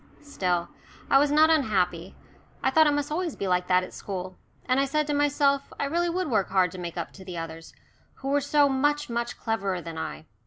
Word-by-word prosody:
Still, 180 -11 -1 0.4
I 270 - +7
was 290 +1 +3
not 310 +2 +5
unhappy. 190 - +1 0.5
I 265 - +2
thought 315 +2 +5
it - - +4
must 290 0 -1
be - - -3
always 340 -2 -3
like 180 -2 0
that 185 0 +3
at - - -9
school, 185 -2 -6 0.3
and 255 +1 +2
I 275 - +3
said 300 +2 0
to 295 - -2
myself 285 -1 +2
I - - 0
really 340 +4 0
would 365 +1 -1
work 215 -8 +1
hard 185 -2 +2
to 185 - -8
make 175 -1 -6
up 170 - -4
to 190 - -12
the 180 -2 -7
others, 165 0 -7 0.4
who 270 - -5
were 285 +1 +2
so 285 +1 +3
much, 290 0 0
much 235 0 -2
cleverer 200 -5 -2
than 165 -1 -7
I. 75 +2 -6
250 Hz, 225 wpm, -26 LUFS, 180-290 Hz, 0.5 s, I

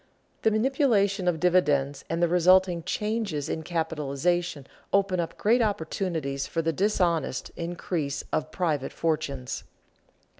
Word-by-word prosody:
_The 220 - +3
manipulation 215 - +2
of 170 -3 +1
dividends 145 -6 +2
and 165 +1 0
the - - +5
resulting 180 0 +4
changes 210 -6 -2
in 160 - -2
capitalization 160 -1 -1 0.3
open 195 -2 +2
up 170 - -3
great 235 +4 +3
opportunities 160 -8 -2
for 165 - -2
the 165 0 0
dishonest 175 -6 0
increase 170 -4 -3
of 155 0 0
private 155 -7 -1
fortunes. 150 -6 -2
170 Hz, 120 wpm, -27 LUFS, 155-190 Hz, 0.3 s, the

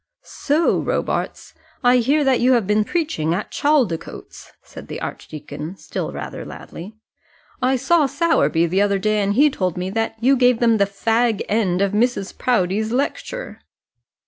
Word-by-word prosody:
"So, 310 +3 0
Robarts, - - -3 0.3
I 250 +1 +5
hear 280 +5 +2
that 265 -3 +2
you 255 +2 +4
have 235 -5 +2
been 210 +2 +2
preaching 210 - -1
at 205 - -5
Chaldicotes," 265 - -1
said - - -12
the - - -6
archdeacon, 155 +4 -7
still - - -5
rather - - -7
loudly. 195 +6 -10 0.7
"I 260 +1 +2
saw 285 +4 +2
Sowerby 280 - +1
the 185 +4 +1
other 200 -1 +2
day, 215 +2 0
and 200 0 0
he 290 +4 +5
told 185 -8 -2
me 180 +1 -3
that 225 +1 -2
you 260 +4 +4
gave 250 -2 +3
them 230 -2 +3
the 200 - +3
fag 225 +2 0
end 200 -4 +1
of 200 - 0
Mrs. 215 -2 0
Proudie's 215 -2 0
lecture." - - -3
225 Hz, 160 wpm, -20 LUFS, 195-265 Hz, 0.7 s, I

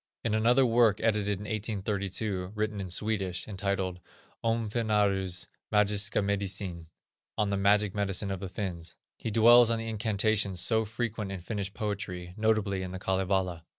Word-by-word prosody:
In 115 - 0
another 120 +4 +4
work 115 -3 +4
edited 105 -2 +1
in 100 - -8
1832, 100 -2 -2
written 105 -1 -2
in 95 - -5
Swedish, 95 -1 -1
entitled: 95 -3 -2 0.4
Om 115 -1 0
Finnarues 100 -5 +1 0.3
Magiska 105 0 +2
Medicin 95 -4 -2 0.5
(On 105 -1 +1
the - - +1
Magic 100 0 +3
Medicine 100 -1 -1
of 95 - -3
the 95 -1 -5
Finns), 90 -5 -5 0.2
he - - -5
dwells 115 +2 +7
on 115 - +2
the 115 0 -5
incantations 105 -3 0
so 110 +4 +2
frequent 110 -2 -3
in 95 - -5
Finnish 100 +1 -4
poetry, 90 -5 -4
notably 110 -3 +1
in 95 - -4
the 95 0 -6
Kalevala. 95 -3 0
100 Hz, 150 wpm, -29 LUFS, 95-110 Hz, 0.5 s, dwells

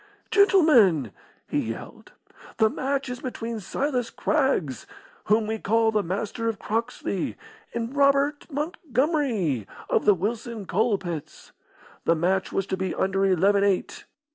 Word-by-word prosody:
"Gentlemen," 250 - +5 0.4
he - - 0
yelled, - - -7 0.4
"the 220 0 +4
match 275 +1 -2
is 250 -1 -5
between 235 -3 -5
Silas 250 +4 -2
Craggs, 265 - 0 0.4
whom 215 +2 +3
we 220 +1 -3
call 225 +2 +2
the 215 -1 +2
Master 205 +5 -2
of 220 - -3
Croxley, 225 -4 -3 0.4
and 235 +3 -3
Robert 280 +1 +2
Montgomery, 270 - -1 0.2
of - - +2
the 205 - +6
Wilson 220 +3 -4
Coal 215 +3 +1
pits. 170 -5 -7 0.5
The 165 - +4
match 185 +4 0
was 195 - -1
to 190 - -3
be 190 -1 -2
under 195 +1 +1
eleven 195 +2 +3
eight. 195 -2 0
220 Hz, 135 wpm, -25 LUFS, 190-260 Hz, 0.5 s, the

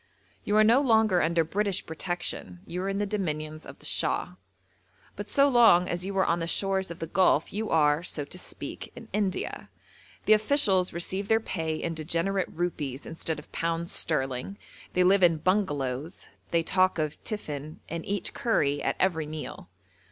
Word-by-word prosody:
You 205 - 0
are 215 - +7
no 235 +5 +5
longer 220 -8 +4
under 165 +1 +2
British 200 +3 -1
protection, 160 - -4
you 180 +2 -4
are 195 - -2
in 195 - -1
the 205 - 0
dominions 155 -6 -3
of - - -10
the - - -12
Shah. - - +1 0.8
But 205 +1 -7
so 280 0 +4
long 225 -9 +6
as 175 +1 -2
you 195 +1 -4
are 190 - +4
on 170 - +1
the 165 - -2
shores 190 +1 +1
of 170 - -7
the 165 - -4
Gulf 165 -2 +2
you 215 +2 -2
are, 150 -1 +3
so 150 -4 -2
to 180 - -8
speak, - - -7
in 230 -2 -11
India. 200 -2 -2 0.6
The 215 - +6
officials 210 -5 +3
receive 190 +3 -2
their 220 +1 +4
pay 160 -7 -3
in 165 +1 -3
degenerate 170 +5 -1
rupees 150 -6 -3
instead 160 -1 -4
of 150 - -12
pounds 165 +1 -2
sterling, 135 +4 -2 0.4
they 180 - +3
live 190 +2 +5
in 170 -3 +5
'bungalows,' 150 -5 -1 0.2
they 170 -1 +2
talk 185 +2 +2
of 155 -2 -3
'tiffin,' 155 -8 -5
and 165 0 -4
eat 200 -1 -3
curry 145 -11 +1
at - - 0
every 160 -5 +1
meal. 155 0 -7
175 Hz, 180 wpm, -28 LUFS, 155-200 Hz, 0.8 s, are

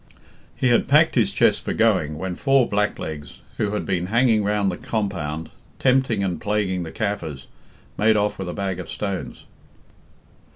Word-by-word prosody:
"'He 130 - +1
had 120 - +3
packed - - +5
his - - +2
chest - - +2
for - - -2
going, 75 0 +2
when 95 +2 -3
four 135 +5 +3
blacklegs, 80 -7 -3 0.2
who 105 -1 -1
had 105 - -2
been 90 -2 -1
hanging 115 0 +3
round 100 -1 +1
the 90 - -5
compound, 85 -8 -3 0.3
tempting 130 -5 +2
and 90 -4 -2
plaguing 100 -3 0
the 80 -2 -6
Kaffirs, 80 -10 -3 0.5
made 110 +1 +4
off 105 -1 0
with 95 -2 -4
a - - -4
bag 95 -3 -3
of 90 - -7
stones. 100 -3 -5
100 Hz, 165 wpm, -23 LUFS, 90-105 Hz, 0.5 s, packed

